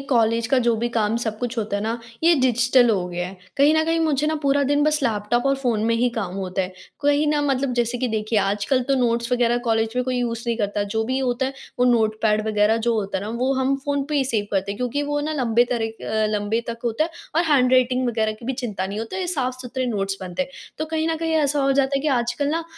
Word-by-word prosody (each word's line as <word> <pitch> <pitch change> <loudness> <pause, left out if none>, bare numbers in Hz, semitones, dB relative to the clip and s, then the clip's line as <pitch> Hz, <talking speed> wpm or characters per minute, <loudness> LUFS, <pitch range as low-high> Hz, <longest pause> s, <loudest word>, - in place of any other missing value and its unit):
College 230 -2 +2
का 260 +3 +3
जो 235 -1 +3
भी 235 +2 -1
काम 215 0 +1
सब 220 -2 -3
कुछ 245 +1 -3
होता 210 -2 -1
है 200 - -3
ना 225 +2 -2 0.2
ये 335 +1 +6
डिजिटल 245 0 +4
हो 185 -4 0
गया 175 0 -3
है। 190 - -11 0.2
कहीं 285 +2 +5
न 315 - +3
कहीं 330 +1 +1
मुझे 300 -2 +1
ना 310 - +1
पूरा 280 0 +2
दिन 290 +2 +2
बस 305 -1 +1
लैपटॉप 235 +1 0
और 275 - +3
फ़ोन 235 -5 0
में 230 +1 +2
ही 240 +2 +2
काम 190 -5 -3
होता 190 -1 -2
है। 185 - -5 0.3
कहीं 290 +1 +3
न 295 0 +2
मतलब 270 -1 0
जैसे 240 0 0
कि 255 - 0
देखिए, 215 0 0
आजकल 205 +6 +1
तो 275 - +3
नोट्स 235 -1 0
वग़ैरह 240 -1 +2
कॉलेज 225 0 +1
में 250 - +1
कोई 255 0 -1
यूज़ 235 -1 -2
नहीं 235 -1 0
करता। 205 -1 -1
जो 220 +2 -2
भी 260 +3 -1
होता 255 -1 0
है 270 - -5 0.2
वो 250 - +4
नोटपैड 220 -2 +2
वग़ैरह 215 +1 +3
जो 235 - +3
होता 200 -3 -1
है 200 - -6
ना 215 - -4
वो 260 +2 +1
हम 265 +1 +1
फ़ोन 285 -1 0
पे 300 - 0
ही 275 - +2
सेव 220 -5 -1
करते 195 0 -1
हैं - - -8
क्योंकि 250 +5 -1
वो 290 0 -1
ना 305 +2 -2
लंबे 240 -5 +2
तरह 230 -2 0
के - - -10
अ, 220 0 0
लंबे 210 +2 0
तक 235 0 -5
होता 235 +6 +1
है 335 - -5 0.3
और 340 - +3
हैंड-राइटिंग 255 -1 +3
वग़ैरह 220 -2 0
की 215 +2 -13
भी 265 - 0
चिंता 220 -7 -3
नहीं 200 +2 -5
होती 225 +10 -5
है - - -2
ये - - -2
साफ़-सुथरे 255 -4 -2
नोट्स 195 -4 -1
बनते 185 +5 -3
हैं। 270 - -8 0.3
तो 310 - -1
कहीं 320 0 -1
न 325 - 0
कहीं 325 0 -1
ऐसा 295 -2 +2
हो 275 - +3
जाता 275 0 +2
है - - 0
कि 305 - +1
आजकल 245 +4 -2
ना 330 +2 -1
240 Hz, 270 wpm, -22 LUFS, 220-275 Hz, 0.3 s, ये